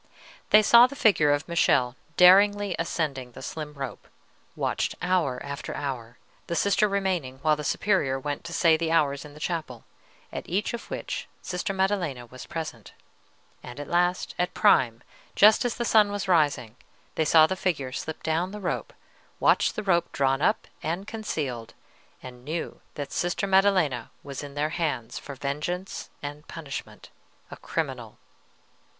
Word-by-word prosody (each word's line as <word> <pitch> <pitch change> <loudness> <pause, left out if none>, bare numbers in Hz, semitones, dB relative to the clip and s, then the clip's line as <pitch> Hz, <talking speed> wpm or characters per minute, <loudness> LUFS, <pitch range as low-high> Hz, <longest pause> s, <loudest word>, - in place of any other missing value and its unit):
They 215 0 +7
saw 235 +3 +8
the 280 - -10
figure 190 - +4
of 145 +1 0
Michele 130 -7 +2 0.2
daringly 200 +1 +6
ascending 140 -7 -2
the - - -10
slim 150 -2 -6
rope; 135 -3 -7 0.5
watched - - -1
hour 175 -8 0
after 140 0 -6
hour, 125 -4 -5 0.3
the 170 - -2
Sister 200 +3 +3
remaining 185 -10 -1
while 155 -1 +4
the 150 - -6
Superior 145 -7 +1
went 145 +1 -4
to 170 - -6
say 165 -1 +4
the 165 0 -1
hours 145 -3 +1
in 145 -1 -12
the - - -12
chapel, 155 -8 -4 0.5
at - - -6
each 195 +7 -1
of 235 - -7
which - - -5 0.2
Sister 180 +2 -3
Maddelena 190 -10 -1
was 125 +1 -11
present; 155 -10 -6 0.7
and 125 +3 -10
at 145 - -6
last, 175 +2 +1
at 180 +1 -1
prime, 115 -2 +3 0.3
just 215 +3 +6
as 240 - -1
the 235 - -2
sun 210 -3 +4
was 205 -1 -3
rising, 145 -9 +1 0.4
they 160 - +1
saw 155 +1 +6
the 190 - -2
figure 150 -9 -2
slip 160 +4 -6
down 165 +3 0
the 210 +2 -7
rope, 185 - -3 0.5
watched - - +3
the - - -3
rope 175 -4 +1
drawn 135 0 +1
up 215 - +1 0.2
and 170 +4 -3
concealed, 140 - -4 0.5
and 125 -1 -10
knew 160 +4 -5
that 145 -1 -5
Sister 175 +2 -1
Maddelena 190 - +2
was 140 -2 -6
in 145 -1 -9
their 150 +1 0
hands 150 -8 -3
for 140 - -9
vengeance 150 +7 -4
and 145 +1 -7
punishment, 155 -4 -8 0.4
a - - -8
criminal. - - -4
160 Hz, 160 wpm, -26 LUFS, 140-185 Hz, 0.7 s, saw